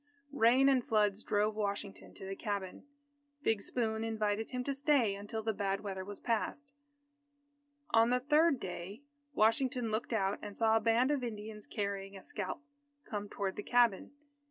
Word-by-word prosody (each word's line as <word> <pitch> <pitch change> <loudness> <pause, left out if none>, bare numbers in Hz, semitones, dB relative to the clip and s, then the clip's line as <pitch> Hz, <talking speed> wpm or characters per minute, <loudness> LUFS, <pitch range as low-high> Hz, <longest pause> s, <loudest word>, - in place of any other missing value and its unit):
Rain 255 +1 +5
and 265 -3 +4
floods 210 -2 +1
drove 210 +1 +1
Washington 200 -1 -4
to - - -8
the 195 0 -4
cabin. 200 +4 -4 0.6
Big 220 -5 +2
Spoon 220 -1 -1
invited 220 -1 -1
him 250 0 -3
to 280 - -1
stay 275 -6 +3
until 205 +2 -5
the 220 0 0
bad 195 -1 -1
weather 190 -2 -4
was 205 +1 -8
past. 270 +5 -2 1.2
On 225 +1 +5
the 250 +1 +3
third 295 +1 +3
day, 185 +6 -6 0.3
Washington 230 +1 +2
looked 220 +3 -2
out 200 -3 0
and 205 -1 -7
saw 225 -1 +4
a - - +5
band 235 +4 +3
of 280 -3 0
Indians 215 -2 -6
carrying 200 -1 -3
a 190 - -12
scalp, 205 +8 -5 0.4
come 205 -1 -4
toward 195 -2 -3
the - - -2
cabin. 235 -2 +2
220 Hz, 165 wpm, -33 LUFS, 200-245 Hz, 1.2 s, Rain